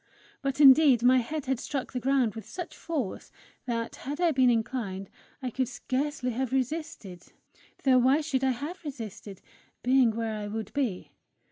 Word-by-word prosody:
But 275 0 -2
indeed 270 -3 +7
my 255 +1 +6
head 295 +5 -4
had 265 -2 -1
struck 275 -1 -4
the 250 - -1
ground 260 -4 +2
with 225 - -9
such 355 -2 -6
force, 290 - -4 0.4
that, 230 -1 -3
had 290 +4 -6
I 345 -2 +3
been 260 -3 +4
inclined, 220 -5 -2 0.3
I 250 - -2
could 260 +2 -1
scarcely 255 +1 -2
have 255 +1 -2
resisted 255 - -3 0.6
though 260 -2 +5
why 265 +5 +4
should 280 -4 -1
I 265 - +3
have 290 +10 -4
resisted, 220 - -8 0.4
being 255 -1 +4
where 225 0 -2
I 210 -1 -4
would 215 0 -5
be! 250 -10 -2
255 Hz, 165 wpm, -28 LUFS, 230-275 Hz, 0.6 s, indeed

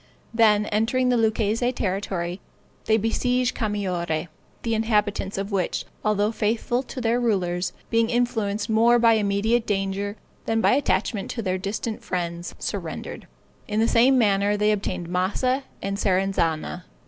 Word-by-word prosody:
Then, 215 -2 +4
entering 230 +5 +1
the 250 - +3
Lucchese 225 +1 +1
territory, 185 -4 -2 0.4
they 220 - +3
besieged 245 +3 0
Camaiore, 180 -7 -2 0.3
the 230 - 0
inhabitants 210 -3 0
of 195 +2 -3
which, 190 -3 -1 0.2
although 210 0 +2
faithful 230 +3 0
to 265 - -8
their 235 0 +1
rulers, 185 -6 0 0.2
being 230 0 +3
influenced 225 -4 0
more 230 +2 +4
by 230 -1 +5
immediate 220 +2 +1
danger 200 0 -1 0.3
than 225 0 +1
by - - +4
attachment 215 -5 0
to 230 - -4
their 185 -1 -1
distant 215 +3 -4
friends, 170 -1 -4
surrendered. - - -5 0.4
In 215 0 -1
the 225 - +3
same 255 +4 +5
manner, 205 -2 +2
they 210 +1 +3
obtained 190 -4 -2
Massa 205 +10 0 0.2
and 200 0 -2
Serezana. 185 -4 0
210 Hz, 140 wpm, -24 LUFS, 195-230 Hz, 0.4 s, by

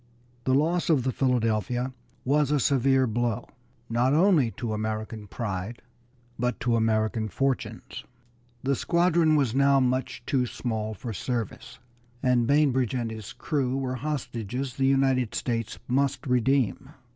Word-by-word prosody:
The 130 - +3
loss 165 +5 +1
of 145 -6 +3
the 130 - 0
Philadelphia 125 0 0 0.3
was 145 +1 +2
a 150 -1 +2
severe 135 0 +3
blow, 120 0 -1 0.4
not 120 +4 +2
only 165 - +4
to 120 -5 -3
American 110 0 -4
pride, 100 0 -5 0.6
but 125 +1 -1
to 120 -1 +2
American 110 0 +1
fortunes. 135 +3 -2 0.6
The 135 +1 +1
squadron 170 0 +3
was 135 -6 +2
now 140 +1 +4
much 130 -1 -1
too 125 -3 +1
small 110 -3 -3
for 115 +3 -6
service, 115 0 -4 0.5
and 125 -2 +3
Bainbridge 135 -4 +2
and 120 -3 -2
his 110 -2 -7
crew 135 -3 -1
were 130 -2 -2
hostages 130 -2 -4
the 135 -1 +1
United 135 -3 +2
States 115 -3 -2
must 135 +3 0
redeem. 125 -1 +1
125 Hz, 135 wpm, -26 LUFS, 115-135 Hz, 0.6 s, only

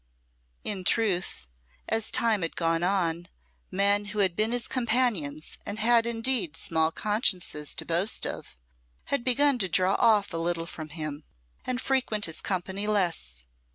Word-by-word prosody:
In 195 -3 -2
truth, 185 - +1 0.4
as 225 0 0
time 225 -4 +2
had 165 - -3
gone 165 -1 +1
on, 175 -2 0 0.4
men 200 +1 +2
who 210 +1 -8
had 190 -4 +2
been 215 +4 +1
his 245 -1 -1
companions, 220 - -1
and 205 - -5
had 230 +1 +3
indeed 225 - 0
small 160 -1 0
consciences 185 - -1
to - - -3
boast 175 +6 +1
of, - - -6 0.6
had 280 - +1
begun 260 +1 +4
to 190 -3 +1
draw 185 +3 +3
off 215 -6 +4
a - - -2
little 165 0 -1
from 155 -2 -8
him, 155 -1 -5 0.4
and 250 -1 -1
frequent 255 -7 0
his 165 - -5
company 190 +2 -2
less. 165 - -1
195 Hz, 155 wpm, -27 LUFS, 165-225 Hz, 0.6 s, begun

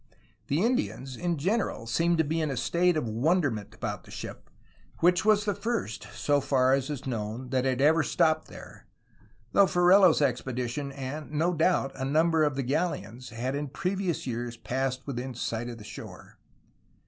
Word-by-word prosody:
The 150 +7 +1
Indians 230 - -1
in 175 +1 -1
general 185 - -1
seemed 165 +9 +1
to 160 - +4
be 160 +2 -1
in 155 - 0
a 135 - -3
state 175 +7 +2
of 150 - -1
wonderment 115 - 0
about 105 -5 -4
the - - -17
ship, - - -8 0.5
which 175 +1 +3
was 215 -1 +4
the 205 - +1
first, 215 - -3
so 145 -1 +1
far 130 -2 +3
as 135 0 0
is 145 -4 -5
known, 115 0 -4
that 130 0 0
had 130 0 +1
ever 160 +3 +5
stopped 155 +1 +1
there, - - -12 0.6
though 200 -1 +5
Ferrelo's 180 0 +5
expedition 130 0 -1
and, 140 +2 -6
no 165 +4 +1
doubt, 165 -4 +2
a 130 - -5
number 160 +3 +3
of 145 -3 +1
the 135 - -1
galleons 130 -4 -2
had 120 +3 -3
in 145 +1 -2
previous 180 +3 -2
years 120 -1 -4
passed 130 +1 -2
within 130 -2 -4
sight 115 0 -3
of 120 - -7
the 110 - -11
shore. 105 - -11
140 Hz, 175 wpm, -28 LUFS, 125-170 Hz, 0.6 s, ever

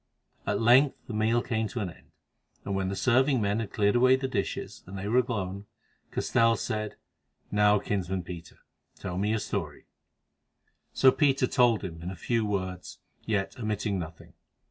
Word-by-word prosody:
At 100 0 +1
length 125 +5 +5
the 120 - -7
meal 110 +2 +2
came 110 -2 -1
to 120 - -5
an 95 -5 -3
end, - - -19 0.6
and 100 - -2
when 95 -1 -1
the 100 - -2
serving 130 +4 +3
men 105 0 0
had 115 -3 -4
cleared 105 0 +2
away 130 +2 +6
the 130 0 -2
dishes, 105 -7 -3
and 95 +2 -7
they 95 +1 -4
were 120 +4 +4
alone, 100 -5 -3 0.4
Castell 115 -1 +2
said: 110 -2 -3 0.6
"Now, 105 0 +4
kinsman 95 -2 -2
Peter, 85 -1 -9 0.4
tell 90 -1 -4
me 105 +2 0
your 110 - +2
story." - - -4 1.1
So 130 - +5
Peter 135 -2 +3
told 120 -4 +3
him, 80 -4 -6
in 90 +2 -5
few 115 +6 0
words, 95 -3 -4 0.3
yet 105 +1 -1
omitting 105 -3 -1
nothing. 80 -1 -9
105 Hz, 165 wpm, -28 LUFS, 95-120 Hz, 1.1 s, away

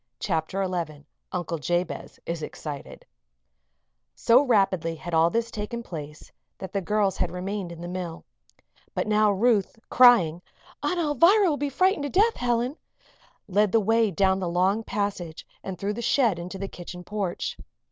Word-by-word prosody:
CHAPTER 185 +2 -1
XI 160 -5 -4 0.3
UNCLE 170 -2 -3
JABEZ 175 +4 -2
IS 170 -1 -3
EXCITED 150 -1 -7 1.1
So 240 +3 +5
rapidly 195 - +2
had 170 +2 -8
all 165 +1 +5
this 230 +4 -1
taken 225 +3 -5
place 150 -6 -9 0.3
that 190 -1 -8
the 200 - 0
girls 205 0 +1
had - - 0
remained 185 0 -4
in 170 0 -9
the 175 - -5
mill. 175 -2 -6 0.7
But - - 0
now 215 -1 +3
Ruth, 210 0 +2
crying: 190 -10 +6 0.4
"Aunt 360 - -1
Alvirah 340 - +4
will 300 - +1
be 290 0 -1
frightened 370 +4 +2
to - - -2
death, 425 - +3
Helen!" 245 +4 0 0.7
led 205 +1 +2
the 225 - +4
way 225 +1 +3
down 190 +1 +2
the 180 -2 -2
long 190 +5 +1
passage 195 -7 -3 0.2
and 190 -1 -5
through 200 +3 -2
the 235 - -5
shed 235 -6 +2
into 180 +3 -6
the 195 +1 -4
kitchen 180 -1 -9
porch. 200 -2 -3
195 Hz, 160 wpm, -26 LUFS, 175-230 Hz, 1.1 s, crying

